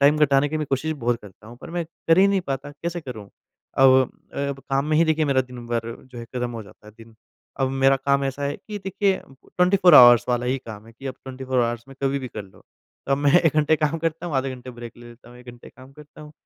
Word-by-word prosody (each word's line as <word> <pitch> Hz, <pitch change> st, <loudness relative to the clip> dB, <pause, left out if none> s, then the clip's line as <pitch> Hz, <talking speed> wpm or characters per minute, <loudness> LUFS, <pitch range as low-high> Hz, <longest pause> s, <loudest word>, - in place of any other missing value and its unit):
Time 145 Hz, +2 st, +4 dB
घटाने 145 Hz, -1 st, +3 dB
की 155 Hz, -, -3 dB
भी 155 Hz, -, -2 dB
कोशिश 140 Hz, +3 st, -2 dB
बहुत 120 Hz, -5 st, -1 dB
करता 100 Hz, +1 st, -15 dB
हूँ 120 Hz, +2 st, -12 dB
पर -, -, -10 dB
मैं 170 Hz, 0 st, -2 dB
कर 165 Hz, +1 st, 0 dB
ही 195 Hz, -, +6 dB
नहीं 200 Hz, -1 st, +1 dB
पाता, 140 Hz, -3 st, -5 dB
कैसे 170 Hz, +4 st, -5 dB
करूँ? 110 Hz, -9 st, -9 dB, 0.5 s
अव 130 Hz, 0 st, +7 dB
अ, -, -, -13 dB
अब 140 Hz, -1 st, -5 dB
काम 135 Hz, +1 st, +1 dB
में 155 Hz, 0 st, +1 dB
ही 165 Hz, -, +5 dB
देखिए 160 Hz, -1 st, +1 dB
मेरा 140 Hz, -3 st, +2 dB
दिनभर 120 Hz, -2 st, -5 dB, 0.2 s
जो 120 Hz, -, -9 dB
है 115 Hz, -, -7 dB
ख़त्म 125 Hz, 0 st, -4 dB
हो 115 Hz, -2 st, -6 dB
जाता 105 Hz, -, -18 dB
है 105 Hz, -, -13 dB
दिन, 115 Hz, 0 st, -15 dB, 0.5 s
अब 135 Hz, -, +2 dB
मेरा 135 Hz, 0 st, +3 dB
काम 140 Hz, +1 st, 0 dB
ऐसा 135 Hz, +1 st, -4 dB
है 140 Hz, +1 st, -2 dB
कि 210 Hz, -1 st, -8 dB
देखिए 195 Hz, 0 st, 0 dB
24 180 Hz, +6 st, +2 dB
ऑवर्स 120 Hz, -3 st, +9 dB
वाला 125 Hz, 0 st, 0 dB
ही 130 Hz, +2 st, 0 dB
काम 110 Hz, -1 st, -9 dB
है 115 Hz, -, -15 dB
कि 135 Hz, +4 st, -11 dB
अब 130 Hz, -, -4 dB
24 130 Hz, 0 st, -3 dB
ऑवर्स 120 Hz, 0 st, -2 dB
में 135 Hz, -, -13 dB
कभी 140 Hz, 0 st, +1 dB
भी 130 Hz, -, -6 dB
कर 110 Hz, -, -7 dB
लो। 95 Hz, -1 st, -19 dB, 0.5 s
तो 135 Hz, -, 0 dB
अब 135 Hz, -, +2 dB
मैं 145 Hz, -1 st, +2 dB
1 165 Hz, -3 st, +1 dB
घंटे 155 Hz, +1 st, +3 dB
काम 155 Hz, +1 st, -1 dB
करता 165 Hz, +1 st, -3 dB
हूँ, 165 Hz, -, -4 dB
आधे 135 Hz, 0 st, -1 dB
घंटे 125 Hz, 0 st, -10 dB
ब्रेक 120 Hz, -1 st, -10 dB
ले 120 Hz, 0 st, -13 dB
लेता 120 Hz, +1 st, -16 dB
हूँ, 125 Hz, -, -14 dB
1 125 Hz, -, -17 dB
घंटे 120 Hz, 0 st, -14 dB
काम 130 Hz, +1 st, -16 dB
करता 150 Hz, +1 st, -15 dB
हूँ। 150 Hz, 0 st, -12 dB
135 Hz, 265 wpm, -23 LUFS, 120-150 Hz, 0.5 s, ऑवर्स